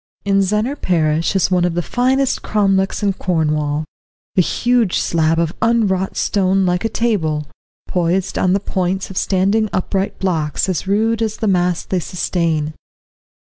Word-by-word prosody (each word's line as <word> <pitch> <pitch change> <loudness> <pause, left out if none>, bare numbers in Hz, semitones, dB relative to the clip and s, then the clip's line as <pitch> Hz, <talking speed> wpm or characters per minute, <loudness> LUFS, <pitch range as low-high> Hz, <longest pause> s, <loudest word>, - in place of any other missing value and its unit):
In 195 0 +3
Zennor 215 +8 -1
parish 165 0 +1
is 190 0 +2
one 180 -1 +3
of 175 -1 0
the 175 - 0
finest 260 +4 +1
cromlechs 195 -2 +1
in 200 -1 +2
Cornwall, 155 -4 -1 0.5
a 185 - +5
huge 240 +1 +1
slab 165 -1 +1
of 165 0 0
unwrought 210 -5 +1
stone 195 -1 +1
like 180 0 0
a 225 - 0
table, 165 -11 0 0.4
poised 180 +2 0
on 185 -1 +2
the 195 - +2
points 190 -1 -2
of 190 - -8
standing 200 +3 +1
upright 190 +1 -2
blocks 160 -4 -1
as 185 0 -2
rude 220 +3 +1
as 220 -1 -1
the 220 - -1
mass 180 -2 +1
they 185 - -1
sustain. 165 -3 -1
190 Hz, 155 wpm, -18 LUFS, 170-205 Hz, 0.5 s, a